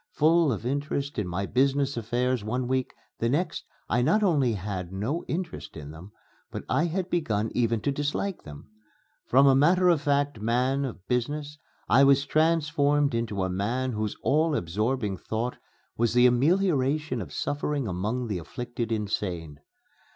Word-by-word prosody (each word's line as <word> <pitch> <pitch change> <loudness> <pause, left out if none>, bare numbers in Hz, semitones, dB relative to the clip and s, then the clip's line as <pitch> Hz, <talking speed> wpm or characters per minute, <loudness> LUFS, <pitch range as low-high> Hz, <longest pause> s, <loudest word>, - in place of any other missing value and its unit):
Full 160 0 +4
of 110 0 -4
interest 140 0 -2
in 105 - -2
my 90 +3 -2
business 140 +4 +1
affairs 120 +1 -1
one 125 +4 -2
week, 130 0 -1 0.2
the 115 - +1
next 155 +8 -1 0.2
I 120 - +1
not 165 - +3
only 145 - +3
had 95 -3 -4
no 110 - -2
interest 165 - -5
in 75 -1 -8
them, 85 +6 -11 0.4
but - - -6
I 165 - +2
had 175 +2 -2
begun 115 - -1
even 115 -2 +1
to 140 - 0
dislike 145 +7 -2
them. 75 -1 -11 0.6
From 135 +3 +5
a 135 - +6
matter 175 +7 +4
of 165 -5 +3
fact 145 -5 0
man 125 +5 +1
of 105 -7 -8
business 145 +4 -2 0.3
I 135 +3 +5
was 140 0 +5
transformed 145 -2 +2
into 110 -4 -1
a 95 - -1
man 120 +8 -1
whose 110 -2 -2
all 155 +1 +2
absorbing 105 - -1
thought 115 +6 -3 0.4
was 120 +1 +1
the 125 0 +6
amelioration 145 - +2
of 80 -7 -8
suffering 145 - -2
among 105 +7 -2
the 105 -6 -3
afflicted 120 +6 -5
insane. 90 -8 -3
125 Hz, 160 wpm, -27 LUFS, 110-145 Hz, 0.6 s, a